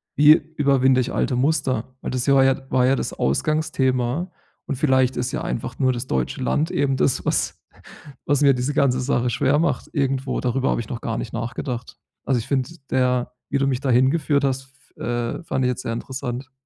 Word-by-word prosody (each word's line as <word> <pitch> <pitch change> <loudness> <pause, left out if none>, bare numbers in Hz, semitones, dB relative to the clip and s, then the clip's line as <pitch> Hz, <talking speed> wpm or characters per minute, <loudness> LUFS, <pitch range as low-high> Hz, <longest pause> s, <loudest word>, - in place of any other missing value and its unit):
Wie 150 +1 +8
überwinde 140 -4 +2
ich 125 - -3
alte 130 - 0
Muster? 130 -3 0
Weil - - -4
das 130 0 -2
war 135 -1 +6
ja 135 0 0
war 125 -1 +3
ja 130 +2 +4
das - - -3
Ausgangsthema. 135 - 0 0.3
Und - - -3
vielleicht 130 -2 +2
ist 125 0 -1
ja - - -2
einfach - - -4
nur 130 -1 +3
das 125 +1 -5
deutsche 65 -1 -2
Land 160 +3 0
eben 135 -1 +1
das, 130 - +1
was - - -1 0.6
was 145 0 +1
mir 140 -1 +6
diese 125 +3 -2
ganze 130 -3 +2
Sache 125 -2 0
schwer 130 +5 +2
macht 170 - -1
irgendwo. 135 -2 -1
Darüber 130 +1 0
habe - - 0
ich 110 - -10
noch 120 - -5
gar 115 -1 -3
nicht 110 - -5
nachgedacht. 120 +2 -5 0.3
Also, 130 -3 +1
ich 110 - -7
finde 135 -1 0 0.2
der 125 -1 +1 0.2
wie - - +1
du 135 - +2
mich 130 -1 -1
da 135 - -1
hingeführt 140 +3 +2
hast 135 -1 -1 0.3
f - - -36
äh, 120 +5 -2
fand 135 -5 -1
ich - - +2
jetzt 125 0 -3
sehr 115 - -2
interessant. 130 +1 -5
130 Hz, 205 wpm, -22 LUFS, 125-140 Hz, 0.6 s, Wie